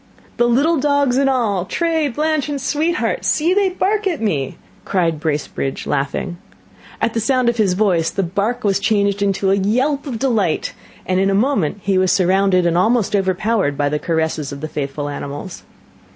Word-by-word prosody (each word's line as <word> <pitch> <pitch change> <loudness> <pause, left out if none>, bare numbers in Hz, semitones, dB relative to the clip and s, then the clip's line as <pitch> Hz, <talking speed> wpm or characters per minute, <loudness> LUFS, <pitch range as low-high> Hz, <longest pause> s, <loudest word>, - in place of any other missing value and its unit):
"The 240 - +3
little 285 +8 +3
dogs 285 -2 +2
and 275 0 +3
all, 220 -8 0
Tray, 325 - 0
Blanch, 300 +2 -1
and 285 -1 -2
Sweetheart 320 - -1
see, 325 +4 +2
they 400 -1 +2
bark 400 +3 0
at 340 -5 -1
me!" 150 - -2 0.3
cried 170 -5 0
Bracebridge, 150 -3 -3
laughing. 145 +5 -2 0.6
At 230 - 0
the 230 - 0
sound 250 +2 +2
of 235 - -2
his 205 -5 +2
voice 180 -5 +2
the 195 - -2
bark 200 +7 -2
was 200 -2 +2
changed 200 -1 +1
into 195 -1 +1
a 195 - +3
yelp 260 +9 0
of 245 -4 -3
delight, 220 -9 0 0.3
and 185 0 0
in 195 +1 +2
a 195 - +1
moment 205 - 0
he 195 -1 +2
was 185 -1 +2
surrounded 190 -1 +3
and 170 -1 +2
almost 220 +1 +2
overpowered 190 -4 0
by 145 0 +1
the 150 +1 -1
caresses 160 -2 -1
of 140 0 -7
the 155 - -3
faithful 145 -1 -4
animals. 145 +4 -6
200 Hz, 180 wpm, -19 LUFS, 175-270 Hz, 0.6 s, The